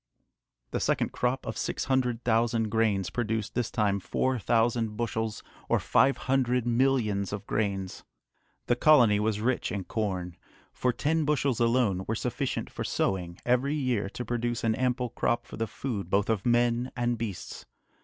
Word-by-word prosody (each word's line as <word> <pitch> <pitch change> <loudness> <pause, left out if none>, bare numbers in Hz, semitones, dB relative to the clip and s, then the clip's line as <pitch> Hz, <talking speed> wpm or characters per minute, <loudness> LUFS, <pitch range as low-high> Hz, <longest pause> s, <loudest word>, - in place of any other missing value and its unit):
The - - -1
second - - 0
crop 125 +2 -1
of - - -4
six - - -2
hundred 125 -3 0
thousand 115 -1 +1
grains 105 -4 +1
produced 110 -3 -2
this 120 -2 -1
time 105 -4 +1
four 130 +6 -1
thousand 115 0 +1
bushels, 110 -1 -2 0.3
or - - +3
five 135 +1 +3
hundred 125 -2 +1
millions 120 -5 +1
of 100 0 -5
grains! 100 -3 -2 0.6
The 120 - +2
colony 120 -7 +5
was 105 0 0
rich 125 +2 0
in 100 -2 -3
corn, 90 -5 -3 0.4
for 125 - +1
ten 155 +5 0
bushels 140 -4 +1
alone 115 -6 +2
were 110 - 0
sufficient 125 +4 -2
for - - -6
sowing 90 -2 -1
every 125 +4 +2
year 125 -9 0
to 125 - -6
produce 120 -1 -2
an 115 -1 +2
ample 125 +1 0
crop 120 - 0
for - - -10
the 115 - -1
food 110 -4 -4
both 100 +3 +2
of 110 0 -1
men 120 +1 +2
and 120 -1 0
beasts. 110 -5 -6
115 Hz, 165 wpm, -28 LUFS, 105-125 Hz, 0.6 s, colony